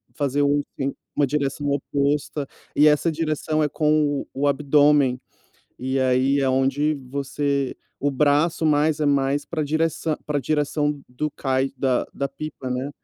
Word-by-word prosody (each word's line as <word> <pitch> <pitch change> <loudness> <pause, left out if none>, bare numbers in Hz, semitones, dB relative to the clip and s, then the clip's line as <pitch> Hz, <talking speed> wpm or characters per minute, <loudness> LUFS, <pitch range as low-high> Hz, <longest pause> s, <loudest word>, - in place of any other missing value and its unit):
fazer 145 -1 0
um 145 +1 +2 0.2
assim, 135 0 -1 0.2
uma 145 -2 +2
direção 145 0 -1
oposta. 140 +1 -1 0.3
E 150 +1 +6
essa 150 +3 +3
direção 155 -1 -1
é 150 - +1
com 150 -2 +1
o 145 +2 0
abdômen. 145 -2 +3 0.6
E, 130 +1 -1
aí 130 +2 +2
é 135 -1 +2
onde 135 +3 +1
você 140 0 -1 0.2
o 145 +1 0
braço 150 +4 +2 0.4
é - - +2
mais 140 0 +1
para 160 -2 -3
a - - +1
direção 160 0 0
para 150 -1 -1
a - - -1
direção 150 -1 0
do 145 +4 -3
Kite 135 -1 -1
da 130 -3 +1
da 140 - -2
pipa, 140 -2 -7
né. 125 +2 -2
145 Hz, 155 wpm, -23 LUFS, 135-150 Hz, 0.6 s, E